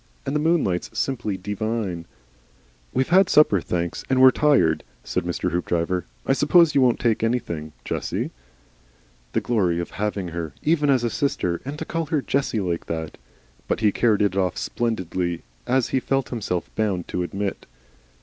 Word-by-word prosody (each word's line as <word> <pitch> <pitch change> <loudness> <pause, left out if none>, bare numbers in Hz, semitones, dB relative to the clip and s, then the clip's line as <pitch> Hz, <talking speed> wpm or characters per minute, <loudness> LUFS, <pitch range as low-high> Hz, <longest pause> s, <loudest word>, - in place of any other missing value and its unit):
And 140 - -2
the - - +3
moonlight's 145 - 0
simply 115 -4 -1
dee 105 +3 -5
vine." 105 -6 -3 0.8
"We've 130 - 0
had 185 +2 +5
supper, 105 - +5
thenks, 85 0 -2
and 130 -1 +3
we're 130 0 +9
tired," 130 - +3 0.2
said - - -2
Mr. 90 +1 -1
Hoopdriver. 90 +1 -1 0.2
"I - - +3
suppose 155 +3 +5
you 140 - +4
won't 125 -2 +3
take 115 -3 +1
anything, 85 -10 -2
Jessie?" - - -2 1.0
The - - +1
glory 95 -8 +1
of 85 - -4
having 100 -3 -2
her, 85 -2 -5
even 150 -2 +2
as 130 -3 +3
a 120 - 0
sister! 90 - -1
and 140 +2 -5
to 160 - -5
call 165 -1 -2
her 150 -3 0
Jessie 135 -6 0
like 85 -3 -2
that! 80 -2 -4 0.5
But - - -1
he 105 -2 +4
carried 110 -1 +2
it 100 -2 +1
off 95 -3 0
splendidly, 95 -7 -2 0.2
as 130 0 +2
he 135 - +1
felt 135 0 -1
himself 100 -7 -3
bound 100 -5 -1
to 90 - -2
admit. 100 +3 -3
110 Hz, 170 wpm, -23 LUFS, 90-135 Hz, 1.0 s, we're